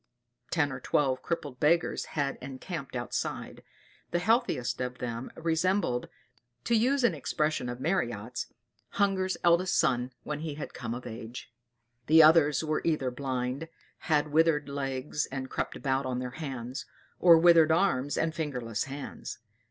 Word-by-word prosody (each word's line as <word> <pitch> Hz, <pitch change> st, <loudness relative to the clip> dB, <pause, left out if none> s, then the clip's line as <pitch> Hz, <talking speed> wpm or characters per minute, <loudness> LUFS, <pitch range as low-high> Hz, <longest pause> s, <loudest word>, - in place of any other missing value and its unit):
Ten 145 Hz, -4 st, +1 dB
or 135 Hz, -, -5 dB
twelve 130 Hz, 0 st, +1 dB
crippled 145 Hz, -6 st, -4 dB
beggars 165 Hz, +3 st, +2 dB
had 140 Hz, -1 st, 0 dB
encamped 135 Hz, +1 st, -6 dB
outside. 120 Hz, -1 st, -4 dB, 0.5 s
The 175 Hz, -, 0 dB
healthiest 175 Hz, -, +1 dB
of 125 Hz, 0 st, -3 dB
them 120 Hz, 0 st, -4 dB
resembled, 165 Hz, -4 st, 0 dB, 0.5 s
to -, -, 0 dB
use 255 Hz, +4 st, +2 dB
an 235 Hz, -7 st, +4 dB
expression 150 Hz, -2 st, -1 dB
of 120 Hz, 0 st, -5 dB
Marryat's, 125 Hz, -, -2 dB, 0.5 s
"Hunger's 190 Hz, -2 st, +1 dB
eldest 175 Hz, +1 st, +4 dB
son 125 Hz, 0 st, +2 dB
when 150 Hz, -1 st, -4 dB
he 155 Hz, -2 st, -4 dB
had 150 Hz, -, -7 dB
come 115 Hz, -, -4 dB
of 125 Hz, -, -8 dB
age"; 120 Hz, +1 st, -8 dB, 0.5 s
the 160 Hz, +1 st, +8 dB
others 155 Hz, -2 st, +5 dB
were 155 Hz, -1 st, 0 dB
either 150 Hz, -6 st, 0 dB
blind, 130 Hz, +3 st, -3 dB, 0.3 s
had 150 Hz, -2 st, +1 dB
withered 155 Hz, -2 st, +3 dB
legs 140 Hz, +1 st, -2 dB
and 130 Hz, -1 st, -5 dB
crept -, -, -2 dB
about 135 Hz, -1 st, -1 dB
on 125 Hz, -1 st, -2 dB
their 125 Hz, 0 st, -4 dB
hands, 130 Hz, -4 st, -6 dB, 0.3 s
or 170 Hz, -2 st, +8 dB
withered 165 Hz, -1 st, +6 dB
arms 150 Hz, -6 st, +2 dB
and 160 Hz, 0 st, 0 dB
fingerless 125 Hz, -9 st, -3 dB
hands. 140 Hz, -2 st, -7 dB
145 Hz, 145 wpm, -29 LUFS, 125-165 Hz, 0.5 s, the